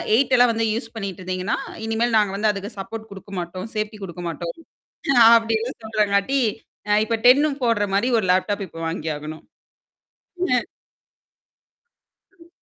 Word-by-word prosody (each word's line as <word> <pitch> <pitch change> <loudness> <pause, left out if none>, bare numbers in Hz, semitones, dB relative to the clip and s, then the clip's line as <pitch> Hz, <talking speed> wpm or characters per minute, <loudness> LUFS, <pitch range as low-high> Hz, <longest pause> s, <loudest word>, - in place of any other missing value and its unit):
8 260 +1 +2
எல்லாம் 245 -1 +6
வந்து 225 0 0
யூஸ் 230 0 -5
பண்ணிட்ருந்தீங்கன்னா, 185 -1 -3 0.3
இனிமேல் 225 +1 0
நாங்க 205 -2 +2
வந்து 210 +1 +1
அதுக்கு 200 +1 -6
சப்போர்ட் 220 +3 -7
கொடுக்க 195 +1 -11
மாட்டோம், 185 +3 -5
சேஃப்டி 215 0 -3
கொடுக்க 175 -1 -7
மாட்டோம் 170 +1 -5 0.8
அப்படின்னு 225 +1 0
சொல்றாங்காட்டி 215 +4 +1 0.5
அ - - +4
இப்போ 230 0 0
10னும் 280 +2 +5
போடுற 230 -4 +2
மாரி 235 +6 +2
ஒரு 205 - 0
லேப்டாப் 200 +2 0
இப்போ 165 - -12
வாங்கியாகணும். 155 -1 -5 1.1
ம். 250 -1 +2 1.7
ம், 335 0 -18
215 Hz, 135 wpm, -22 LUFS, 190-230 Hz, 1.7 s, எல்லாம்